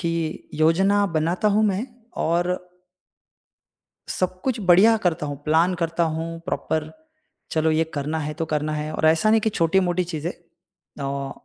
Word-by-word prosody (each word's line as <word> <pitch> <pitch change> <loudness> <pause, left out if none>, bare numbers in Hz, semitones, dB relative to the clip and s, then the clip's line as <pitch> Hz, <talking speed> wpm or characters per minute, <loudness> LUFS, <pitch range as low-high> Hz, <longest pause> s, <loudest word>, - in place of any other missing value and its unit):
कि 165 -2 -3
योजना 190 +6 +3
बनाता 170 +4 0
हूँ 210 +1 +3
मैं 205 +4 0 0.4
और 175 +2 +1 1.5
सब 185 0 -2
कुछ 255 -4 -1
बढ़िया 195 +4 +6
करता 160 -4 0
हूँ, 145 - -4
प्लान 165 +4 +3
करता 170 -1 -1
हूँ 165 +1 -3
प्रॉपर। 160 -3 -2 0.6
चलो 160 0 +1
ये 160 +1 +2
करना 150 +2 -2
है 150 -1 -3
तो 165 - -2
करना 155 0 -1
है 150 0 -3
और 155 - 0
ऐसा 160 +7 +4
नहीं 220 0 +5
कि 220 - 0
छोटी-मोटी 180 0 +1
चीज़ें 165 -1 -4 0.7
औ 140 0 -3
165 Hz, 150 wpm, -23 LUFS, 155-185 Hz, 1.5 s, बढ़िया